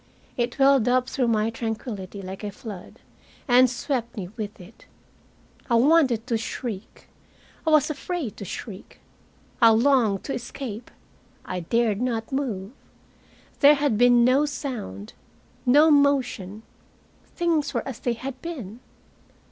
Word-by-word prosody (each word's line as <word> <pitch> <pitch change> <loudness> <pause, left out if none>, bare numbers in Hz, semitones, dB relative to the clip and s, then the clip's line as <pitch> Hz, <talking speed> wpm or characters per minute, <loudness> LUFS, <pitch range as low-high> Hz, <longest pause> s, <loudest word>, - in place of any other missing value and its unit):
It 240 +1 -2
welled 270 -4 +4
up 250 0 +2
through 255 -4 -1
my 220 -1 +1
tranquillity 215 -4 -5
like 190 +2 -8
a 210 - -3
flood, 205 -3 -10 0.5
and 250 0 +6
swept 240 -1 -3
me 180 -3 -5
with 215 -1 -6
it. 185 +5 -15 0.8
I 235 - +3
wanted 255 -3 +4
to 235 -3 -1
shriek. 225 -3 -6 0.6
I - - +5
was 305 -1 +4
afraid 305 - -4
to - - -7
shriek. 195 +1 -8 0.6
I 230 - +8
longed 225 -3 +3
to 275 - -4
escape. 240 -2 -6 0.6
I 185 - -4
dared 220 +4 0
not 230 -2 -2
move. 230 -8 -3 0.9
There 290 +1 +7
had 285 -5 +1
been 240 +1 +5
no 270 +4 +3
sound, 240 - -6 0.5
no 295 +5 +6
motion. 255 -8 +1 0.7
Things 320 -4 0
were 240 -2 -3
as 265 -4 -6
they 240 - -1
had 260 +2 -7
been. 245 - -7
240 Hz, 135 wpm, -24 LUFS, 215-275 Hz, 0.9 s, I